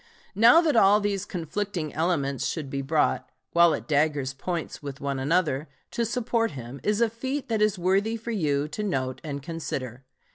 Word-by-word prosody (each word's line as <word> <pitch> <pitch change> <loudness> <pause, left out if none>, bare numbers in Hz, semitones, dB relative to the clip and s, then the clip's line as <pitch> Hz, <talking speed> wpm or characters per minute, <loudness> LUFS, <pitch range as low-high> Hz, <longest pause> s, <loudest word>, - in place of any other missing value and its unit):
Now 230 - +7
that 310 -5 +1
all 205 -1 +6
these 205 -1 -1
conflicting 180 -2 -4
elements 145 -5 0
should 150 -5 -4
be 140 - -2
brought, 150 +3 +1 0.2
while 170 -1 +5
at - - -8
daggers' 145 -3 +1
points 170 +4 -4
with 140 -2 -7
one 140 -1 -2
another, 150 0 +1 0.2
to 235 - 0
support 230 -1 0
him, 125 +3 -8
is 210 +2 0
a 235 - +5
feat 260 +4 -4
that 220 -2 0
is 210 -1 +3
worthy 195 +5 +1
for 230 +1 -6
you 150 -8 0
to 185 - -5
note 130 -10 -2
and 140 -3 -5
consider. 135 -6 -5
170 Hz, 180 wpm, -26 LUFS, 140-210 Hz, 0.2 s, Now